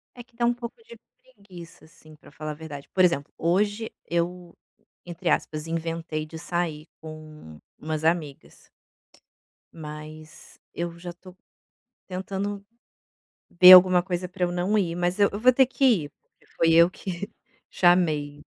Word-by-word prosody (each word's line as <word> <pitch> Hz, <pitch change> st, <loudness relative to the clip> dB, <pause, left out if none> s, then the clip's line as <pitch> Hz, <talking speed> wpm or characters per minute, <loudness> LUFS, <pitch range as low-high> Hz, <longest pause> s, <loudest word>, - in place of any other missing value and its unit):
É 245 Hz, -, -10 dB
que 245 Hz, 0 st, -33 dB
dá 235 Hz, 0 st, 0 dB
um 240 Hz, -, +3 dB
pouco 235 Hz, -1 st, -8 dB
de 465 Hz, +1 st, -14 dB, 0.4 s
preguiça, 175 Hz, -, -14 dB
assim, 155 Hz, 0 st, -18 dB
pra 150 Hz, -, -19 dB
falar 155 Hz, +1 st, -6 dB
a -, -, -5 dB
verdade, 145 Hz, -2 st, -10 dB
por 185 Hz, -, +3 dB
exemplo, 170 Hz, -5 st, +1 dB
hoje 205 Hz, +6 st, 0 dB
eu, 170 Hz, +1 st, -3 dB, 0.5 s
entre 175 Hz, 0 st, -4 dB
aspas, 155 Hz, +1 st, -1 dB
inventei 165 Hz, -1 st, -4 dB
de 160 Hz, +1 st, -10 dB
sair 165 Hz, -2 st, -4 dB
com 155 Hz, -, -12 dB, 0.2 s
umas 155 Hz, 0 st, -4 dB
amigas. 160 Hz, -4 st, -3 dB, 1.1 s
Mas 155 Hz, 0 st, -11 dB
eu 170 Hz, 0 st, -5 dB
já 175 Hz, 0 st, -8 dB
tô 185 Hz, +1 st, -16 dB, 0.7 s
tentando 195 Hz, +2 st, -5 dB, 0.9 s
ver 180 Hz, +1 st, +8 dB
alguma 180 Hz, -1 st, +7 dB
coisa 180 Hz, -1 st, -3 dB
pra 180 Hz, 0 st, -5 dB
eu 175 Hz, -, -3 dB
não 180 Hz, +4 st, 0 dB
ir. 170 Hz, -4 st, -1 dB
Mas 175 Hz, +1 st, -1 dB
eu 200 Hz, -, +4 dB
eu 205 Hz, -, -5 dB
vou 255 Hz, +2 st, +5 dB
ter 265 Hz, +1 st, +5 dB
que 270 Hz, +2 st, -1 dB, 0.2 s
ir, 145 Hz, -, -10 dB
porque -, -, -33 dB
foi 165 Hz, 0 st, +3 dB
eu 170 Hz, +1 st, +6 dB
que 190 Hz, +3 st, -7 dB, 0.4 s
chamei. 155 Hz, -5 st, +1 dB
175 Hz, 155 wpm, -25 LUFS, 155-185 Hz, 1.1 s, ver